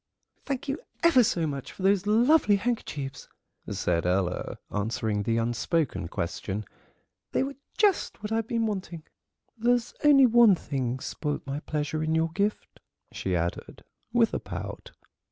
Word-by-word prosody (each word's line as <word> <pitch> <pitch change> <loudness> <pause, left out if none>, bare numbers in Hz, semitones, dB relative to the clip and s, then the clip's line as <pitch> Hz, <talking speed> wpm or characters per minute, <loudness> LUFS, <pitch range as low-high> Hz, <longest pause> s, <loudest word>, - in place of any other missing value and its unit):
"Thank 275 -2 -3
you 280 +2 -2 0.2
ever 330 -7 +6
so 175 -7 +1
much 140 -3 -4
for 185 - -9
those 195 0 +3
lovely 230 +1 +5
handkerchiefs," 150 - -3 0.4
said 85 -1 0
Ella, 90 0 -1
answering 105 0 -1
the 115 +2 0
unspoken 120 - 0
question; 95 +5 -4 0.7
"they - - +2
were 275 +1 -4 0.2
just 400 - +1
what 210 - -4
I've 225 0 0
been 230 -1 0
wanting. 185 -6 -4 0.6
There's 240 +1 +1
only 285 -3 +7
one 235 -4 +6
thing 130 -6 -3
spoilt 150 -2 -3
my 140 +1 -3
pleasure 155 0 -2
in 160 +1 0
your 160 0 +1
gift," 200 +4 -2 0.3
she 95 -1 -2
added, 85 0 -3 0.3
with - - +3
a - - 0
pout. - - -7
165 Hz, 145 wpm, -27 LUFS, -, 0.7 s, only